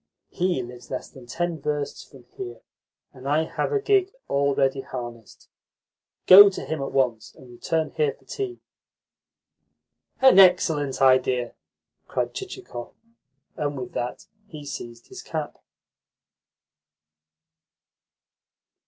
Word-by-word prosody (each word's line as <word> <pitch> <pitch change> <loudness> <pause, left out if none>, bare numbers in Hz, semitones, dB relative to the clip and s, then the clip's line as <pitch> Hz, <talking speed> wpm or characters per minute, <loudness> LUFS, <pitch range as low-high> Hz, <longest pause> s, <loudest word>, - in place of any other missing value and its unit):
He 175 -7 0
lives 120 0 -11
less 130 - -5
than 130 -2 -14
ten 170 +2 -3
versts 145 -1 -3
from 135 -3 -17
here, 120 -3 -7 0.5
and 130 +1 -10
I 150 +3 +2
have 160 - -3
a 425 - +2
gig 400 -2 +2 0.2
already 140 -1 +1
harnessed. 120 -4 -9 0.8
Go 200 +2 +11
to 195 - -7
him 155 -2 -3
at 135 - -4
once, 120 -5 -1
and 125 -2 -15
return 160 +6 -2
here 150 -3 0
for - - -27
tea." 390 -3 -5 1.6
"An 265 -7 +7
excellent 160 -8 +4
idea!" 130 -2 +3 0.5
cried - - -2
Chichikov, 380 - -8 0.6
and 145 -1 -3
with 125 -1 -6
that 120 +1 -4 0.2
he 155 -6 -10
seized 120 -4 -8
his - - -9
cap. - - -5
140 Hz, 120 wpm, -24 LUFS, 125-175 Hz, 1.6 s, Go